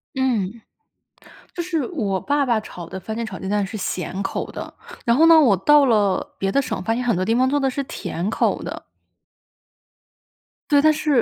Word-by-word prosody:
嗯， 235 -5 -1 0.9
就 345 - -3
是 330 -6 -2
我 205 - -2
爸 285 0 +1
爸 235 -4 +1
炒 175 -5 -9
的 190 +3 -7
番 220 +4 -6
茄 230 - -2
炒 195 -4 -7
鸡 190 - -6
蛋 205 0 0
是 210 - -7
咸 190 -1 -3
口 195 - -4
的。 - - -7 0.3
然 235 - +4
后 315 - +5
呢， 330 -1 +8
我 225 -10 +4
到 290 +9 +5
了 205 -6 +1
别 195 0 -1
的 275 - +3
省， 270 - -4
发 225 +5 0
现 245 - -2
很 240 -5 +1
多 185 - 0
地 225 +4 +1
方 255 +2 +3
做 290 +2 +1
的 270 -1 +1
是 280 +2 -3
甜 180 -6 -4
口 - - 0
的。 - - -6 1.9
对， 285 -2 +5
但 310 - +5
是 295 -5 +2
235 Hz, 220 characters per minute, -21 LUFS, 195-280 Hz, 1.9 s, 呢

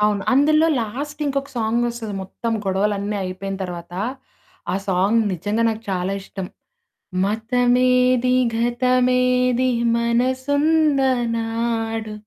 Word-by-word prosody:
అవును. 210 -1 +2
అందులో 305 +4 +4
లాస్ట్ 285 +7 -5
ఇంకొక 275 0 -2
సాంగ్ 230 +1 0
వస్తది 225 -3 -5
మొత్తం 230 +4 -4
గొడవలన్నీ 200 +2 -1
అయిపోయిన 190 +1 -5
తర్వాత. 175 -1 -8 0.8
ఆ - - 0
సాంగ్ 195 +5 +2
నిజంగా 205 +6 -1
నాకు 220 0 -3
చాలా 185 +1 -1
ఇష్టం. 190 -1 -7 0.8
మతమేది 250 +3 +2 0.2
గతమేది 250 +1 +2 0.3
మనసున్నా 270 +5 +2 0.3
నాడు. 225 -1 -2
235 Hz, 100 wpm, -21 LUFS, 210-255 Hz, 0.8 s, అందులో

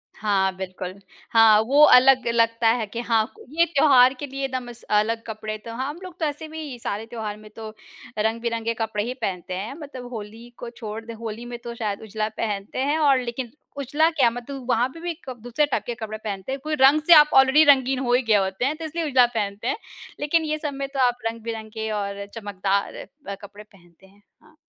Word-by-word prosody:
हाँ 195 -2 +1
बिल्कुल। 185 -1 -6 0.4
हाँ 220 -2 +7
वो 285 +3 +4
अलग 260 0 +6
लगता 230 0 +2
है 230 -2 0
कि 230 +3 -6
हाँ 225 -2 +3 0.2
ये 335 +3 +3
त्योहार 275 -5 +5
के 290 - -4
लिए 275 0 -3
दम 255 -2 -5
स 235 - -13 0.2
अलग 225 +1 -1
कपड़े 215 -1 -5
तो 230 - -6
हम 280 +7 -4
लोग 365 -1 -10
तो 320 - 0
ऐसे 300 +1 -4
भी 310 -5 -7
सारे 215 0 -4
त्योहार 220 -3 -6
में 215 0 -14
तो 220 -1 -7 0.5
रंग-बिरंगे 230 +1 -1
कपड़े 220 -2 -2
ही 245 - -3
पहनते 185 -2 -3
हैं 210 +7 -5
मतलब 270 -4 -9
होली 225 +2 -8
को 240 - -7
छोड़ 220 0 -6
दें 230 - -7
होली 225 +1 -7
में 240 0 -6
तो 235 -1 -6
शायद 210 -3 -3
उजला 215 0 -3
पहनते 205 0 -3
हैं 290 +4 +1
और 275 -4 +4
लेकिन 240 0 -5 0.3
उजला 290 +4 +2
क्या 285 -7 +3
है 230 - 0
मतलब 255 +2 -7
वहाँ 240 +1 +3
पे 330 +5 -12
भी 345 0 -3 0.2
क - - -4
दूसरे 245 +5 +1
टाइप 250 -7 -2
के 240 - -4
कपड़े 215 -2 -6
पहनते 210 +1 -5
हैं 270 - -3
कोई 310 0 -1
रंग 280 +3 +6
से 345 - +9
आप 300 -1 +8
ऑलरेडी 265 +3 +6
रंगीन 265 -1 +1
हो 245 -2 0
ही 250 - +4
गया 215 -3 +3
होते 190 +5 -2
हैं 290 +3 0
तो 325 - -6
इसलिए 325 +1 -3
उजला 255 -3 +5
पहनते 205 +1 -3
हैं। 270 - 0 0.4
लेकिन 315 +3 +1
ये 305 0 -1
समय 275 -2 -4
तो 270 - -3
आप 245 0 -1
रंग-बिरंगे 220 -1 -4
और 200 -1 -3
चमकदार 200 -2 -2 0.3
अ, 200 - -4
कपड़े 205 +1 -11
पहनते 190 -3 -22
हैं। 200 +2 -24 0.2
हाँ। 310 0 -22
235 Hz, 215 wpm, -24 LUFS, 215-270 Hz, 0.5 s, से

